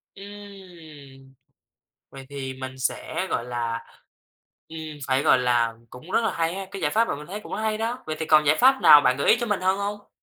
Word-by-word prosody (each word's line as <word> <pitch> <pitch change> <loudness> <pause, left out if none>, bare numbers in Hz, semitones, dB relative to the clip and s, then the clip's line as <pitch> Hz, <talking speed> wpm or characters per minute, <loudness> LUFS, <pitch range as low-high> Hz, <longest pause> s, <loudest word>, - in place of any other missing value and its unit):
Ừm, 175 -10 -13 0.8
vậy 135 -1 -11
thì 135 -2 -6
mình 130 0 -8
sẽ, 130 - -3
gọi 120 - -1
là, 120 -1 -3 0.9
ừm, 160 - -10 0.3
phải, 135 +1 +1
gọi 130 - +4
là, 120 -2 +1 0.2
cũng 140 - -12
rất 230 - +2
là 225 - 0
hay 165 0 -1
ha, 195 0 -5
cái 195 - -7
giải - - 0
pháp 230 +1 +2
mà - - -2
mình 150 +1 -10
thấy 200 +4 -6
cũng - - -10
hay 215 0 -1
đó. 230 +3 -3
Vậy 155 - -4
thì 160 - -2
còn 155 -1 +4
giải 150 +1 +4
pháp 265 +2 +4
nào 150 - +9
bạn 125 -1 +2
gợi 140 - +1
ý 225 - +6
cho 240 - -2
mình 210 -3 -1
hơn 190 +1 +1
hông? 205 +1 -5
160 Hz, 225 wpm, -24 LUFS, 130-205 Hz, 0.9 s, nào